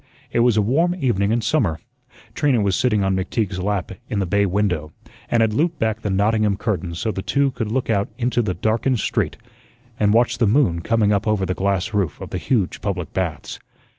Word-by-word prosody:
It -, -, +1 dB
was 120 Hz, -2 st, +4 dB
a 105 Hz, -, +4 dB
warm 165 Hz, -, +2 dB
evening 115 Hz, -, 0 dB
in 115 Hz, +1 st, +1 dB
summer. 110 Hz, -, 0 dB, 0.5 s
Trina 140 Hz, -3 st, +2 dB
was 100 Hz, -3 st, +1 dB
sitting 105 Hz, -3 st, +2 dB
on 95 Hz, 0 st, +1 dB
McTeague's 95 Hz, 0 st, -2 dB
lap 100 Hz, 0 st, -2 dB, 0.2 s
in 110 Hz, -, -2 dB
the 100 Hz, -, +1 dB
bay 100 Hz, +3 st, +2 dB
window, 90 Hz, -5 st, -1 dB, 0.4 s
and 115 Hz, -, +2 dB
had 110 Hz, -1 st, +2 dB
looped 160 Hz, +7 st, +1 dB
back 110 Hz, -1 st, -1 dB
the 105 Hz, -, -2 dB
Nottingham 105 Hz, +1 st, +2 dB
curtains 95 Hz, -7 st, -2 dB
so 110 Hz, +5 st, -1 dB
the 95 Hz, -, -4 dB
two 140 Hz, +6 st, +1 dB
could 115 Hz, -4 st, -4 dB
look 130 Hz, +1 st, -1 dB
out 100 Hz, -3 st, 0 dB
into 125 Hz, -1 st, +1 dB
the 100 Hz, -6 st, -2 dB
darkened 115 Hz, +6 st, 0 dB
street -, -, -1 dB, 0.6 s
and 105 Hz, -1 st, +3 dB
watch 120 Hz, +1 st, +2 dB
the 115 Hz, -, +3 dB
moon 105 Hz, -, +2 dB
coming 110 Hz, +2 st, +2 dB
up 105 Hz, +1 st, 0 dB
over 105 Hz, -3 st, +1 dB
the 90 Hz, -, -1 dB
glass 100 Hz, +3 st, -1 dB
roof 100 Hz, -5 st, -1 dB
of -, -, -8 dB
the 90 Hz, -, -2 dB
huge 105 Hz, -3 st, -1 dB
public 95 Hz, -5 st, -3 dB
baths. 85 Hz, -6 st, -3 dB
105 Hz, 210 wpm, -21 LUFS, 95-120 Hz, 0.6 s, was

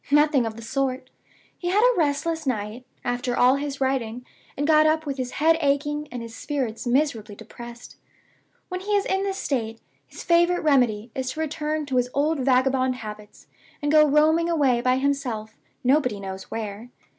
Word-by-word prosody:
Nothing 295 Hz, -4 st, +4 dB
of 220 Hz, -, -6 dB
the 230 Hz, -, -10 dB
sort! 260 Hz, +1 st, -2 dB, 0.5 s
He 350 Hz, -, -4 dB
had 410 Hz, +4 st, +3 dB
a -, -, +5 dB
restless 320 Hz, 0 st, 0 dB
night, 225 Hz, +1 st, -3 dB, 0.2 s
after 245 Hz, 0 st, -1 dB
all 255 Hz, +2 st, +5 dB
his 280 Hz, -1 st, -4 dB
writing, 250 Hz, -3 st, -1 dB, 0.3 s
and 290 Hz, -, 0 dB
got 310 Hz, 0 st, +5 dB
up 315 Hz, 0 st, +1 dB
with 280 Hz, -2 st, -3 dB
his 250 Hz, -1 st, -3 dB
head 325 Hz, +2 st, +3 dB
aching, 295 Hz, +1 st, 0 dB
and 245 Hz, -1 st, -5 dB
his 230 Hz, -1 st, -9 dB
spirits 255 Hz, -4 st, -3 dB
miserably 240 Hz, -6 st, 0 dB
depressed. 240 Hz, +2 st, -11 dB, 0.7 s
When 365 Hz, -, -4 dB
he 415 Hz, +2 st, -2 dB
is 400 Hz, -, +2 dB
in 385 Hz, 0 st, 0 dB
this 390 Hz, -1 st, -2 dB
state, 225 Hz, -, -2 dB, 0.3 s
his -, -, -10 dB
favorite 345 Hz, +1 st, +3 dB
remedy 245 Hz, -7 st, +2 dB
is 260 Hz, -1 st, -3 dB
to 310 Hz, -, -8 dB
return 310 Hz, 0 st, -2 dB
to 265 Hz, -3 st, -1 dB
his 250 Hz, 0 st, +1 dB
old 300 Hz, +2 st, +1 dB
vagabond 260 Hz, 0 st, +2 dB
habits, 210 Hz, -3 st, -10 dB, 0.3 s
and 290 Hz, -1 st, -1 dB
go 305 Hz, 0 st, +7 dB
roaming 315 Hz, +3 st, +3 dB
away 275 Hz, -7 st, +2 dB
by 255 Hz, +1 st, +2 dB
himself 260 Hz, -6 st, -2 dB, 0.3 s
nobody 250 Hz, -5 st, +2 dB
knows 190 Hz, -1 st, -7 dB
where. 220 Hz, +1 st, -6 dB
270 Hz, 180 wpm, -24 LUFS, 240-305 Hz, 0.7 s, go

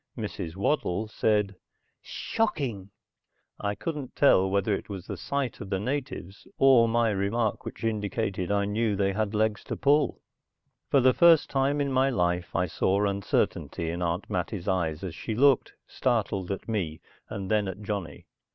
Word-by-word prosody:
Mrs. 80 Hz, 0 st, -5 dB
Waddle 110 Hz, -2 st, 0 dB
said, 105 Hz, -2 st, +1 dB, 0.5 s
"Shocking!" 135 Hz, -, -2 dB, 0.7 s
I 100 Hz, 0 st, -2 dB
couldn't 150 Hz, -3 st, -5 dB
tell 95 Hz, -9 st, +5 dB
whether 100 Hz, +2 st, +1 dB
it 100 Hz, -, -4 dB
was 95 Hz, -3 st, -6 dB
the -, -, -5 dB
sight 140 Hz, -5 st, -3 dB
of 100 Hz, -, -7 dB
the 95 Hz, -, 0 dB
natives, 125 Hz, -5 st, -4 dB
or 130 Hz, -4 st, +6 dB
my 115 Hz, 0 st, +2 dB
remark 105 Hz, +3 st, -1 dB
which -, -, -8 dB
indicated 105 Hz, -3 st, -1 dB
I 100 Hz, 0 st, +2 dB
knew 105 Hz, +1 st, 0 dB
they 100 Hz, 0 st, +1 dB
had 105 Hz, +1 st, -1 dB
legs 110 Hz, 0 st, +1 dB
to -, -, -4 dB
pull. 145 Hz, +2 st, +2 dB, 0.7 s
For 140 Hz, -, +4 dB
the 130 Hz, +1 st, +5 dB
first 170 Hz, -3 st, +5 dB
time 135 Hz, +2 st, +1 dB
in 140 Hz, -1 st, 0 dB
my 130 Hz, +1 st, +3 dB
life 90 Hz, -7 st, -1 dB
I 90 Hz, -, +2 dB
saw 95 Hz, +4 st, +1 dB
uncertainty 100 Hz, -4 st, -1 dB
in 85 Hz, +1 st, -4 dB
Aunt 85 Hz, +2 st, -1 dB
Mattie's 90 Hz, +1 st, -3 dB
eyes 85 Hz, -4 st, 0 dB
as 90 Hz, -4 st, -4 dB
she 110 Hz, +6 st, -4 dB
looked, 135 Hz, +1 st, +4 dB
startled, 105 Hz, -7 st, -1 dB
at 95 Hz, -, -5 dB
me, 90 Hz, -9 st, -2 dB, 0.3 s
and 100 Hz, -2 st, -5 dB
then 105 Hz, -2 st, +2 dB
at 95 Hz, +2 st, -6 dB
Johnny. 100 Hz, -8 st, -5 dB
105 Hz, 165 wpm, -27 LUFS, 95-120 Hz, 0.7 s, or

